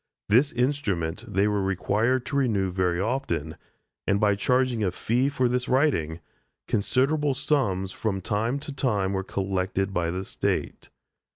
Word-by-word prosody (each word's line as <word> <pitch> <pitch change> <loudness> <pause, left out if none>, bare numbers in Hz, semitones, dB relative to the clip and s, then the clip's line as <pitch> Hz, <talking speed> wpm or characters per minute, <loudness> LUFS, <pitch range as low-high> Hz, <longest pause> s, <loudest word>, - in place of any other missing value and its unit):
This 125 +7 +4
instrument 115 - -1
they 100 +2 +2
were 105 -1 +1
required 105 +6 +1
to 140 - -4
renew 105 -9 +1
very 90 -1 0
often, 95 - -2 0.5
and 100 0 +2
by 105 -1 +4
charging 125 +2 +1
a 95 - +2
fee 120 +8 0
for 130 -3 +1
this 125 +1 -1
writing, 85 - +1 0.5
considerable 135 +6 +1
sums 105 -10 0
from 100 0 -2
time 110 +7 -1
to 145 - -6
time 105 -8 0
were 95 0 -1
collected 95 0 -2
by 85 -2 0
the 90 +3 -3
State. - - -2
105 Hz, 150 wpm, -26 LUFS, 95-130 Hz, 0.5 s, This